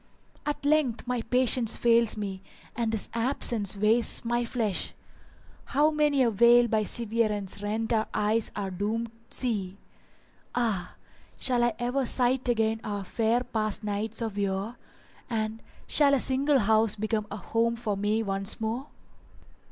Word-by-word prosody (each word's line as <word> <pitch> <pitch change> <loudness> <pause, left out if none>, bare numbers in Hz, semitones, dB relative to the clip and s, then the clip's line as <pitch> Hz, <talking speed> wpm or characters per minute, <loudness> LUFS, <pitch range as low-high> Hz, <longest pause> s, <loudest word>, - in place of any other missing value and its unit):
At 295 -1 -3
length 290 -6 +1
my 250 -1 -1
patience 245 -1 +3
fails 235 -2 +3
me; 195 -2 -5 0.3
and 230 -1 -1
this 220 -2 0
absence 230 -4 +1
wastes 220 +3 +3
my 240 +1 0
flesh; 225 -5 -1 0.3
* - - -27
How 300 +2 +4
many 295 -3 +2
a 235 - +2
veil 235 +3 +5
by 220 -1 +1
severance 210 -3 -2
rent 220 +3 -2
our 220 -1 +1
eyes 215 +2 0
are 195 -2 -3
doomed 215 +5 -3 0.2
see: 205 -6 -2 0.8
Ah! 220 -7 -1 0.4
shall 245 -2 +1
I 240 -2 +1
ever 250 +2 -1
sight 250 +1 +1
again 225 -1 +1
our 205 -1 -4
fair 225 +4 0
past 215 -2 -1
nights 210 +2 -3
of 210 -3 -4
yore; 200 +3 -2 0.3
* - - -28
And 220 -1 -2 0.2
shall 280 -2 +4
a - - +1
single 275 +3 +2
house 220 -1 +3
become 215 0 -2
a 205 - -6
home 230 +3 0
for 220 -3 -3
me 210 +3 0
once 195 +2 -1
more?" 230 +5 -3
225 Hz, 150 wpm, -27 LUFS, 210-240 Hz, 0.8 s, veil